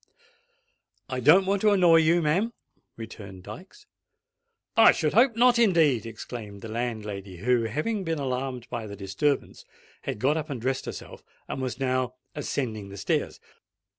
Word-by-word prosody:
"I 130 -1 -2
don't 160 +10 +6
want 195 0 0
to 215 - +5
annoy 180 -5 +5
you, 165 +1 +3
ma'am," 190 +10 +1 0.4
returned 100 -5 -9
Dykes. 190 - -11 0.9
"I 225 - +8
should 155 -2 -1
hope 235 +3 +4
not, 240 0 +4
indeed!" 160 - +3
exclaimed 110 -2 -8
the 115 - -6
landlady, 105 -5 -4
who, 120 +4 +1
having 155 - -2
been 165 -2 -2
alarmed 130 -2 -3
by 115 -2 -4
the 100 - -7
disturbance, 100 +9 -2 0.4
had - - -4
got 140 +8 +1
up 155 0 -4
and 135 -4 -4
dressed 130 +3 -2
herself, - - -8 0.2
and 135 - -4
was 130 0 -4
now 130 -1 -1 0.2
ascending 115 -8 -3
the 100 - -9
stairs. 95 - -1
130 Hz, 155 wpm, -26 LUFS, 110-170 Hz, 0.9 s, I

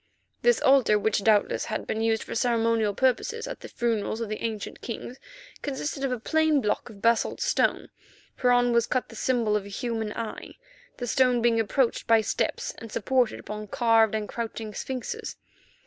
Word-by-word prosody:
This 485 0 +4
altar, 265 -6 +5
which, 210 -1 0
doubtless, 210 -1 +3
had 215 - -3
been 220 - -2
used 225 -1 +1
for - - -7
ceremonial 230 -3 +1
purposes 440 - 0
at - - -6
the - - -9
funerals 225 -2 -1
of 230 -2 -3
the 215 - -4
ancient 220 -3 -4
Kings, 240 +2 -6 0.4
consisted 285 0 -3
of 270 - 0
a 250 - -2
plain 315 +4 +2
block 215 0 -1
of 205 -2 -14
basalt 230 0 +2
stone, - - +1 0.5
whereon 245 -1 +4
was 235 -1 +3
cut 255 - -1
the 230 - -11
symbol 230 -3 +1
of 210 - 0
a - - -9
human 225 0 -3
eye, 230 -2 -6 0.4
the 245 - -4
stone 250 0 +3
being 230 -1 +3
approached 235 +3 0
by 225 -1 +5
steps - - -2
and 225 -1 -9
supported 250 +1 +1
upon 210 +1 -7
carved 225 0 +3
and 215 -1 -2
crouching 225 -2 -5
sphinxes. 255 +3 -5
230 Hz, 180 wpm, -26 LUFS, 220-250 Hz, 0.5 s, altar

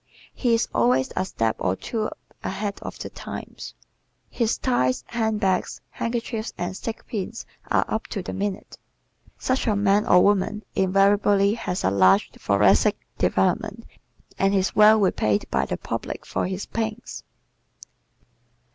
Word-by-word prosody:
He 240 -3 +2
is 230 - 0
always 125 +3 +2
a 185 - +1
step 115 -11 -1
or 90 - 0
two 215 - -3 0.3
ahead 200 +1 -3
of - - -7
the - - -7
times. - - -8 0.6
His 230 -1 0
ties, 130 - +1
handbags, 215 -5 0
handkerchiefs 230 -1 -3
and 175 +2 -3
stick 225 +3 -6
pins 225 0 -5 0.2
are - - +2
"up 220 - -3
to 195 - -4
the - - -5
minute." 200 +1 -4 0.6
Such 260 0 -1
a 215 - +2
man 200 +1 +2
or 180 - +6
woman 205 +1 +1
invariably 200 +1 +3
has 190 -5 -3
a 95 - +2
large 95 -1 +4
thoracic - - +3 0.2
development - - 0 0.5
and 195 +1 +3
is 190 -1 0
well 215 +1 +7
repaid 110 - +1
by - - +1
the - - -2
public - - -5
for - - -2
his 190 +1 -4
pains. 225 +1 -4
200 Hz, 140 wpm, -24 LUFS, 185-220 Hz, 0.6 s, well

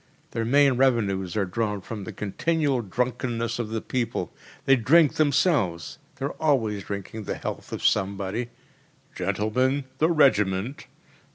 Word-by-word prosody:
Their 115 -1 -2
main 140 +1 +4
revenues 100 -8 +1
are 100 - +2
drawn 105 +2 -2
from 100 +1 -7
the - - -6
continual 145 - 0
drunkenness 120 +1 -2
of 115 -3 -2
the 110 0 -3
people. 115 -8 -3 0.3
They 135 - +6
drink 145 +6 +4
themselves 140 - +1 0.2
they 135 - -4
are 140 - -2
always 115 - +1
drinking 100 +2 -6
the - - -3
health - - -6
of - - -4
somebody: 100 +4 0 0.7
‚ÄėGentlemen, 110 +9 0 0.2
the 160 - +4
Regiment! 120 - +2
115 Hz, 140 wpm, -25 LUFS, 100-135 Hz, 0.7 s, They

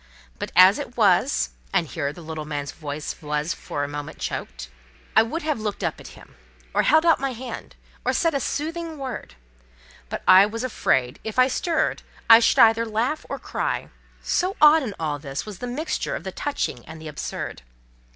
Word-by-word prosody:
But, - - -4
as 185 +5 +7
it 250 -4 -7
was—And 195 - +2
here, 140 0 -3
the 170 +3 -12
little 160 -1 -5
man's 145 -2 -4
voice 150 -1 -6
was 150 +1 -1
for 145 - -4
a - - -2
minute 145 +1 -6
choked. - - -5 0.5
I - - +8
would 280 +10 -3
have 305 -5 -1
looked 210 -2 -4
up - - -2
at - - -11
him, - - -16 0.4
or - - +3
held 315 +1 +4
out 330 - +5
my 270 -1 -2
hand, 245 0 -8 0.3
or - - +1
said 330 -3 +1
a 280 - +1
soothing 320 +4 -3
word; 255 - -6 0.7
but - - -5
I 190 +2 +8
was 230 +3 -5
afraid, 130 - 0
if 220 +1 -6
I 255 0 +6
stirred, 315 +4 0 0.3
I 225 0 +10
should 230 - +3
either 225 0 +6
laugh 230 +7 -2
or - - -3
cry; - - -3 0.3
so 370 +2 0
odd, 305 +1 +7
in 220 -7 -4
all 150 -2 -2
this, 140 -2 -5
was 210 -4 -8
the 245 - -4
mixture 285 +7 -2
of - - -6
the - - -5
touching 210 - -3
and 160 +1 -9
the 160 - -9
absurd. 150 - -5
220 Hz, 190 wpm, -24 LUFS, -, 0.7 s, I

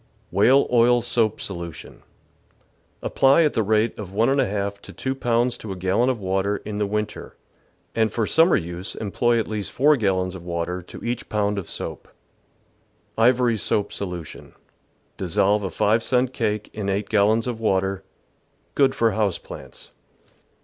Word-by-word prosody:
Whale 125 +9 +4
oil 120 0 +4
soap 115 -3 0
Solution. 85 -4 -7 0.5
— - - -37
Apply 135 +5 +4
at 150 - +2
the - - +1
rate 110 +2 +1
of 100 -3 -7
ll/o 105 -2 +1
to 100 0 -14
2 130 - -2
pounds 120 -1 0
to 105 - -7
a - - -4
gallon 95 +7 +1
of 125 -3 -1
water 95 +1 0
in 105 -1 -4
the 105 - 0
win 105 +1 0
ter, - - -11 0.6
and 110 -2 +1
for 115 0 0
summer 165 - +4
use 85 +1 -4
employ 120 +3 +1
at 110 - -2
least 105 -2 -4
4 150 +3 +4
gallons 95 -4 0
of 90 -2 -9
water 85 +1 -3
to 90 - -11
each 120 0 -3
pound 105 -1 0
of 90 - -8
soap. - - -6 1.1
IvoiiY 120 -1 +3
soAP 100 +1 0
Solution. 90 -5 -6 0.3
— - - -41
Dissolve 95 +3 +1
a 95 - -3
five 105 +6 +2
cent 125 +1 +1
cake 105 -3 -2
in 100 -2 -3
8 100 +1 -1
gallons 110 +2 +3
of 120 -3 -3
water. 95 -2 0 0.7
Good 135 -2 +3
for 115 -1 +2
house 105 -3 0
plants. - - -12
105 Hz, 165 wpm, -23 LUFS, 95-120 Hz, 1.1 s, Whale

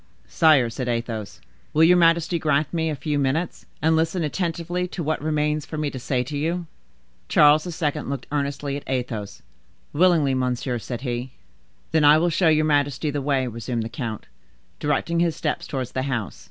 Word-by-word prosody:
"Sire," 145 -8 +4
said 125 +2 -4
Athos, 115 -3 -3 0.3
"will 155 - +4
your 175 +2 +7
majesty 170 0 +3
grant 150 0 +1
me 160 -1 0
a 155 - -2
few 145 +1 -2
minutes, 145 +5 -1 0.2
and 160 +1 +4
listen 165 +2 0
attentively 175 +2 -2
to 180 -1 -5
what 155 0 -1
remains 150 0 0
for 155 - -7
me 150 -2 -1
to 130 - -6
say 125 0 -1
to 145 +4 -6
you?" 170 +4 -1 0.6
Charles 150 +3 +5
II. 150 -4 +2
looked 135 -2 -4
earnestly 140 -1 -2
at 145 - -6
Athos. 120 -6 -4 0.5
"Willingly, 160 -4 +3
monsieur," 125 -1 -1
said 120 +2 -6
he. 125 -1 -4 0.6
"Then 160 -1 +3
I 150 +1 +7
will 170 +2 +2
show 165 +1 +2
your 155 0 +3
majesty 145 0 +1
the 145 0 -2
way," 135 -2 +1
resumed 115 0 -3
the 110 - -5
count, 115 -4 -5 0.5
directing 165 +3 0
his 170 -2 +1
steps 155 -1 -2
towards 130 -3 -4
the 130 - -2
house. 130 -6 -3
145 Hz, 180 wpm, -23 LUFS, 130-160 Hz, 0.6 s, your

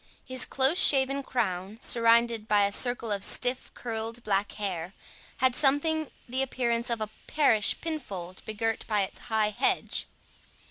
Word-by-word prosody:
His 255 -1 -2
close 270 +7 +3
shaven 275 -2 +4
crown, 195 -6 -2
surrounded 230 -2 +2
by 205 -1 +4
a 200 - -1
circle 240 0 0
of 200 -1 -1
stiff 250 +1 +1
curled 230 0 -4
black 200 -1 0
hair, 185 -3 -4 0.4
had 260 0 +2
something 300 +3 +3 0.2
the 255 +2 -1
appearance 240 -3 -1
of 230 -2 -1
a 215 - -3 0.2
parish 225 -9 +2
pinfold 195 - -6
begirt 225 +1 -2
by 210 -2 +1
its 190 - -6
high 215 -1 +1
hedge. 200 - 0
230 Hz, 145 wpm, -28 LUFS, 210-260 Hz, 0.4 s, shaven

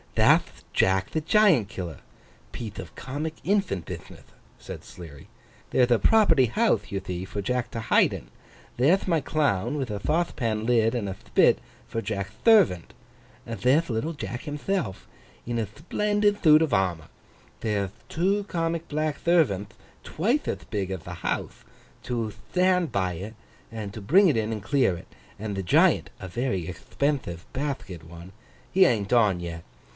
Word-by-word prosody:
'That'h - - +3
Jack 95 0 +2
the 155 - -1
Giant 165 - +4
Killer—piethe 95 - -9
of 90 -4 -8
comic 150 +4 -4
infant 190 - 0
bithnith,' - - -10 0.2
said - - -9
Sleary. 80 -6 -12 0.4
'There'th 125 -1 +3
a 120 - +5
property 165 - +4
houthe, 120 - +1
you 100 - -1
thee, 90 -2 -5
for 100 +2 -5
Jack 125 +3 -1
to 115 - -4
hide 110 - +3
in; - - -7 0.5
there'th 160 +12 +3
my 165 -4 +2
Clown 140 -4 0
with 130 -5 -3
a 105 - -3
thauthepan 115 -7 -1
lid 115 -1 +3
and 110 -4 -2
a 95 - -4
thpit, - - +3 0.3
for 115 - -3
Jack'th 100 -2 -4
thervant; 190 - +4 0.5
there'th 130 +8 +1
little 120 +8 -1
Jack 120 -5 -5
himthelf 150 - -3 0.4
in 120 0 -2
a 110 - -1
thplendid 205 - 0
thoot 155 -1 +6
of 150 -7 -1
armour; 90 -5 0 0.5
there'th 100 -3 -1 0.2
two 195 +5 +1
comic 165 -3 -2
black 155 0 -1
thervanth 130 - +2 0.3
twithe 235 - 0
ath - - -4
big 100 -4 -2
ath 95 -4 -5
the 90 0 -7
houthe, - - -3 0.4
to 115 -4 -3 0.2
thtand 180 -2 +3
by 95 -2 0
it 100 +6 -7 0.4
and 105 -3 -6
to 110 - -7
bring 185 - +5
it 150 - +2
in 110 0 -1
and 105 -3 -4
clear 125 -7 +2
it; - - -13 0.3
and 105 -1 -4
the 95 - -3
Giant 85 - +3
(a 95 - -7
very 95 -2 -2
ecthpenthive 95 - -3
bathket 130 - -4
one), 85 +2 -11 0.4
he 190 0 +6
an't 105 - +1
on 105 -7 +4
yet. 85 -1 -6
115 Hz, 160 wpm, -26 LUFS, 95-155 Hz, 0.5 s, thoot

